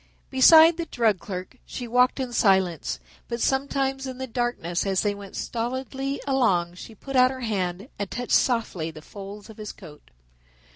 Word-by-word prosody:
Beside 320 +5 +7
the 335 -1 -3
drug 220 -8 +1
clerk 185 +5 -7
she 245 - -7
walked 250 +3 +3
in 255 -2 -3
silence, 190 -7 +2 0.3
but 235 0 -4
sometimes 270 +1 0
in 260 -1 -6
the 260 - -4
darkness 240 -8 -2
as 195 -2 +1
they 205 -1 0
went 200 -1 -10
stolidly 260 +3 -3
along 200 -11 +2
she 220 +5 -11
put 270 +6 -7
out 255 0 +6
her 260 0 -6
hand 195 -5 -2
and 200 -2 -3
touched 245 0 -5
softly 220 -10 +1
the 155 -1 -11
folds 200 +2 -10
of 220 - -13
his 210 -1 -6
coat. 155 -7 -14
235 Hz, 175 wpm, -25 LUFS, 195-260 Hz, 0.3 s, Beside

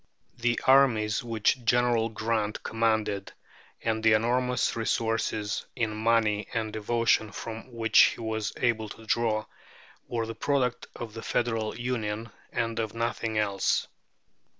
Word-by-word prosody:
The 120 -1 +1
armies 120 -6 +4
which 115 +2 0
General 120 -1 +2
Grant 110 -1 -2
commanded, 110 -3 0 0.5
and 110 -1 0
the 110 -1 +6
enormous 125 +3 +1
resources 110 -2 -1
in 115 -3 -1
money 110 -1 +2
and 110 -1 -1
devotion 110 0 +1
from 115 +5 -7
which 115 -1 +3 0.2
he - - -14
was 110 -2 -2
able 110 -3 0
to 110 - -11
draw, 110 -2 +1 0.6
were 115 -2 -2
the 115 - -5
product 130 -2 0
of 115 -2 -7
the 115 - -7
Federal 115 -3 -1
Union 115 -3 -3 0.2
and 115 0 -1
of 110 -1 -3
nothing 115 -1 -2
else. 100 -2 +1
115 Hz, 130 wpm, -28 LUFS, 110-120 Hz, 0.6 s, the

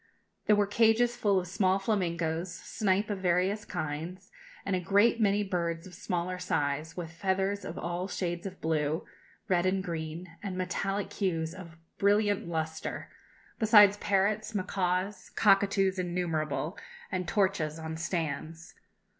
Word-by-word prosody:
There 210 - +6
were 205 0 +3
cages 225 +3 +3
full 205 -5 +2
of 180 - -4
small 190 +1 +2
flamingoes, 175 -4 -1
snipe 205 +1 -1
of 200 - -2
various 185 +3 +1
kinds, 160 +5 -5 0.3
and 195 - +1
a - - 0
great 205 +6 +3
many 205 0 +3
birds 170 -4 -2
of 185 - -12
smaller 180 0 -3
size, 155 -1 -1
with 165 -2 -5
feathers 190 +3 -1
of 170 - -6
all 175 +2 -3
shades 175 -1 -3
of 185 -1 -9
blue, 155 0 0 0.4
red, 180 -3 +2
and 190 0 +1
green, 165 0 -5
and 190 -3 -4
metallic 195 +2 -2
hues 165 -5 -1
of 170 -3 -11 0.2
brilliant 205 -1 +2
lustre, 160 -1 -4 0.5
besides 210 -3 +7
parrots, 205 +2 +1
macaws, 185 0 -1
cockatoos 195 -2 +3
innumerable, 170 -3 -2 0.3
and 185 -2 -2
torchas 185 -6 +1
on 160 0 -5
stands. 165 -1 -3
185 Hz, 140 wpm, -30 LUFS, 165-200 Hz, 0.5 s, besides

